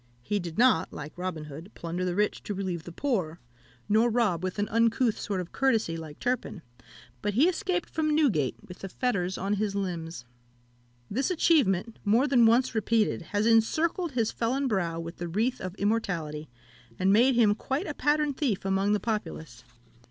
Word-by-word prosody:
He 205 +10 -1
did 170 -3 -6
not, 245 -8 +4
like 150 +1 -8
Robin 180 -3 -4
Hood, 150 +5 -9
plunder 170 +2 -4
the 180 -1 -1
rich 210 +1 0
to 205 - -3
relieve 180 -4 -3
the 175 - -8
poor, 175 - -2 0.5
nor 220 +3 +4
rob 220 -8 +1
with 185 +1 -3
an 205 0 0
uncouth 230 +1 +2
sort 200 -2 -2
of 180 -1 -6
courtesy, 225 -11 +1
like 160 -2 -8
Turpin; 245 -8 -2 0.6
but 205 - -2
he 285 +8 +5
escaped 365 -1 -1
from 305 -1 0
Newgate 220 - +2
with 180 - -11
the 195 - -6
fetters 190 -6 -1
on 195 +2 -1
his 205 -2 -1
limbs. 170 -8 -4 0.9
This 260 +5 0
achievement, 235 - +2
more 225 +6 +3
than 250 -5 +5
once 240 +3 +3
repeated, 220 -2 +1
has 205 +5 -1
encircled 310 +9 +2
his 230 -3 +1
felon 260 +4 -1
brow 175 -7 -1
with 165 +1 -7
the 175 - -4
wreath 225 +9 -1
of 185 0 -5
immortality, 175 -8 -2 0.5
and 190 +1 +3
made 245 +4 +5
him 220 -3 +5
quite 270 - -3
a 295 - -4
pattern 295 0 +1
thief 250 -10 -1
among 195 +1 +2
the 210 - +2
populace. 160 - -4
210 Hz, 180 wpm, -28 LUFS, 180-250 Hz, 0.9 s, he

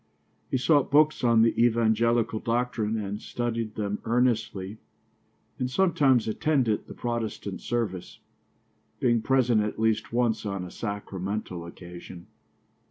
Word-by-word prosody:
He - - +1
sought 145 +2 +3
books 150 0 +4
on 115 -2 +5
the 115 - +3
evangelical 115 -1 +2
doctrine 115 -2 -1
and 105 0 -4
studied 115 -2 -3
them 105 -1 -2
earnestly, 110 -4 0 0.8
and 125 - -1
sometimes 135 - +3
attended 120 -1 +1
the - - -10
Protestant 115 -5 -4
service, 105 -7 -3 0.8
being 120 -3 +2
present 125 -3 +3
at 105 0 -3
least 110 -1 0
once 120 -2 +1
on 100 -3 -3
a 90 - -9
sacramental 100 -4 -4
occasion. 85 0 -10
115 Hz, 120 wpm, -27 LUFS, 105-120 Hz, 0.8 s, on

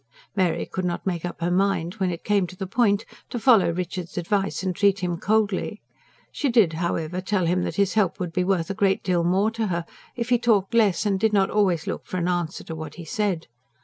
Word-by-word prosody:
Mary 185 -4 +1
could 185 - -4
not 175 -1 -2
make 175 -4 -2
up 175 - -6
her 175 +1 0
mind, 185 -2 +1
when 190 -2 +1
it 170 -1 -5
came 200 -3 +2
to 185 - -11
the 190 - -4
point, 205 +1 +2 0.2
to - - -4
follow 230 -6 +5
Richard's 180 +1 -4
advice 195 +3 -1
and 185 -2 -1
treat 200 0 +2
him 175 -1 -1
coldly. 210 0 0 0.5
She 285 - -1
did, 220 -9 +4
however, 170 +1 -2
tell 190 -1 0
him 180 +2 +1
that - - -4
his 200 -2 +2
help 205 -5 +1
would 175 -3 -3
be 180 - +1
worth 180 -2 0
a - - -1
great 195 0 +1
deal 175 -2 +1
more 190 +5 +2
to 225 -1 -2
her 170 -2 -2 0.3
if 235 0 -3
he 245 -1 +4
talked 220 -4 +2
less 215 -4 +3
and 195 -2 +1
did 220 +1 +2
not 195 -2 +3
always 185 -6 +2
look - - -5
for 185 - -4
an 175 -1 0
answer 175 -2 -2
to 160 - -7
what 155 -1 -7
he 170 - -9
said. 190 -1 -1
190 Hz, 235 wpm, -24 LUFS, 175-205 Hz, 0.5 s, follow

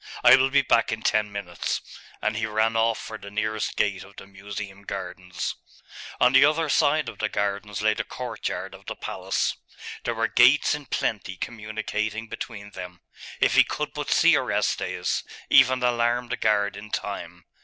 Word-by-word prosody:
I 120 +1 +9
will 130 0 +3
be 140 0 +4
back 115 -2 +3
in 110 0 -4
ten 105 -1 +1
minutes.' 100 -4 -3 0.4
And 110 - 0
he 110 0 -1
ran 110 +1 +1
off 115 0 +2
for 110 -1 -7
the 100 - -9
nearest 110 0 -2
gate 100 -3 0
of 100 0 -16
the - - -10
Museum 100 0 -8
gardens. 90 -2 -5 0.7
On 125 +1 +5
the 130 +1 +8
other 155 +2 +3
side 150 0 +3
of 115 - -8
the 105 - 0
gardens 100 0 -2
lay 110 0 +4
the - - -3
courtyard - - -5
of - - -14
the - - -4
palace. - - -2 0.5
There 120 - -2
were 115 +1 +1
gates 125 +6 +5
in 145 -2 -5
plenty 95 -4 -2
communicating 110 0 -4
between 105 -3 -7
them. 90 -2 -9 0.4
If - - +3
he - - +7
could - - -4
but - - -4
see - - +5
Orestes, - - -1 0.3
even 130 0 +6
alarm 120 0 +1
the - - -1
guard 105 -2 +1
in 105 +1 -9
time!.... 90 -5 -5
110 Hz, 175 wpm, -25 LUFS, 100-120 Hz, 0.7 s, I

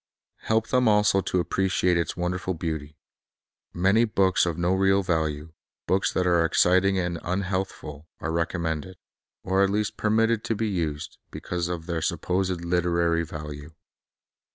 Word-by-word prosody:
Help 110 0 0
them 125 -1 +3
also 105 -2 +4
to 90 - -1
appreciate 90 0 +1
its 85 +1 -1
wonderful 90 +1 -2
beauty. 80 -3 -5 0.7
Many 95 +6 +3
books 95 -5 +2
of 85 -2 -2
no 90 +1 +1
real 95 +1 +3
value, 80 -3 -2 0.3
books 95 +1 +1
that 90 - 0
are 85 -2 +3
exciting 95 +3 +3
and 90 -2 -2
unhealthful, 90 -5 -3
are 80 - -3
recommended, 85 +1 -2 0.5
or 95 +1 +1
at 100 - +2
least 105 +1 -1
per 105 - 0
mitted 115 +1 +2
to 115 - 0
be 110 +2 -1
used, 80 -7 -3
because 85 -1 -4
of 85 -2 -4
their 85 -2 -2
supposed 90 +1 -1
literary 85 -1 +1
value. 75 -1 -8
90 Hz, 150 wpm, -25 LUFS, 85-95 Hz, 0.7 s, also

